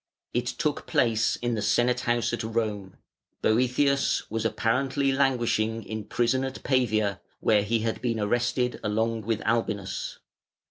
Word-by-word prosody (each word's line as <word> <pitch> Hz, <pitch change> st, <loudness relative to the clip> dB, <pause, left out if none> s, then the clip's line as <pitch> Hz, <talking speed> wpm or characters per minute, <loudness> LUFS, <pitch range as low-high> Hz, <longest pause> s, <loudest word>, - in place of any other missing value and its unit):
It -, -, 0 dB
took -, -, -2 dB
place 115 Hz, -2 st, +2 dB
in 120 Hz, 0 st, +1 dB
the 110 Hz, -, -1 dB
Senate 120 Hz, +4 st, +2 dB
house 120 Hz, -1 st, 0 dB
at 120 Hz, -, -1 dB
Rome; 110 Hz, -4 st, -2 dB, 0.5 s
Boëthius 130 Hz, +5 st, +2 dB
was 115 Hz, 0 st, -2 dB
apparently 135 Hz, +5 st, +1 dB
languishing 120 Hz, -5 st, +1 dB
in 110 Hz, -1 st, -5 dB
prison 120 Hz, +4 st, +1 dB
at 135 Hz, 0 st, -5 dB
Pavia, 110 Hz, -7 st, +1 dB, 0.2 s
where 105 Hz, -2 st, +3 dB
he 110 Hz, +2 st, 0 dB
had 115 Hz, 0 st, -2 dB
been 115 Hz, -3 st, -1 dB
arrested 120 Hz, +3 st, 0 dB
along 110 Hz, +1 st, 0 dB
with 110 Hz, +1 st, -2 dB
Albinus. 110 Hz, -4 st, -1 dB
115 Hz, 140 wpm, -27 LUFS, 110-125 Hz, 0.5 s, where